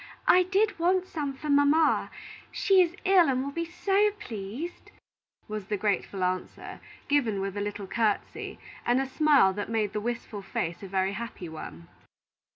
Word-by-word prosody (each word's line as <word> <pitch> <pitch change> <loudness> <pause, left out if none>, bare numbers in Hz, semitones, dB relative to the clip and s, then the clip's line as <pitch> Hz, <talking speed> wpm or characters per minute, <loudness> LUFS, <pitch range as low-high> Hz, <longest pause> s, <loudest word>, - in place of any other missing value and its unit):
I 365 - +7
did 390 +2 +1
want 365 +2 +2
some 295 -6 -4
for 300 - -8
mamma. 290 +2 +3 0.4
She 385 -2 +4
is 350 -1 +1
ill, 370 -5 +5
and 260 0 +1
will 280 - -4
be 335 +3 -3
so 390 +4 +2
pleased," 245 - -7 0.6
was 215 -2 -5
the 210 - -1
grateful 200 -1 -1
answer, 185 0 -3 0.3
given 245 -9 +1
with 195 0 -3
a 205 - -2
little 205 0 -4
courtesy, 215 +1 -2 0.3
and 245 +2 +2
a 270 - 0
smile 275 -7 +4
that 205 +2 -4
made 215 -3 0
the 210 - -2
wistful 230 -2 -4
face 170 -3 -3
a 195 - -7
very 190 +1 0
happy 205 -5 -6
one. 85 - -9
240 Hz, 165 wpm, -28 LUFS, 200-330 Hz, 0.6 s, I